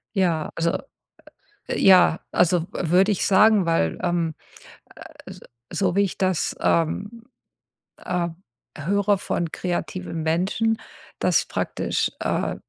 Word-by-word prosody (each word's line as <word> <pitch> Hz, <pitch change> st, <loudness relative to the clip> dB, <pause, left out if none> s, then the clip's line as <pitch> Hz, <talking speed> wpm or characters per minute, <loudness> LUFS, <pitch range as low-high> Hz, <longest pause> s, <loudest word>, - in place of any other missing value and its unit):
Ja, 170 Hz, -5 st, 0 dB
also 165 Hz, 0 st, 0 dB, 0.9 s
ja, 180 Hz, -4 st, +5 dB
also 175 Hz, -1 st, +3 dB
w 170 Hz, -, -3 dB
würde 190 Hz, +4 st, +4 dB
ich 200 Hz, -, -1 dB
sagen, 210 Hz, 0 st, +5 dB
weil, 125 Hz, -, +1 dB
ähm, 175 Hz, -3 st, 0 dB, 0.9 s
äh, -, -, -9 dB
s -, -, -11 dB, 0.3 s
so 185 Hz, -3 st, 0 dB
wie 200 Hz, -, +4 dB
ich 195 Hz, -, -3 dB
das, 185 Hz, -3 st, 0 dB
ähm 205 Hz, +8 st, 0 dB, 0.8 s
ähm, 175 Hz, -2 st, -2 dB, 0.4 s
höre 200 Hz, +6 st, +1 dB
von 170 Hz, -3 st, -3 dB
kreativen 180 Hz, -1 st, -4 dB
Menschen, 190 Hz, +8 st, 0 dB, 0.4 s
dass -, -, +2 dB
praktisch, -, -, -2 dB
äh, -, -, -1 dB
180 Hz, 120 wpm, -23 LUFS, 165-195 Hz, 0.9 s, ja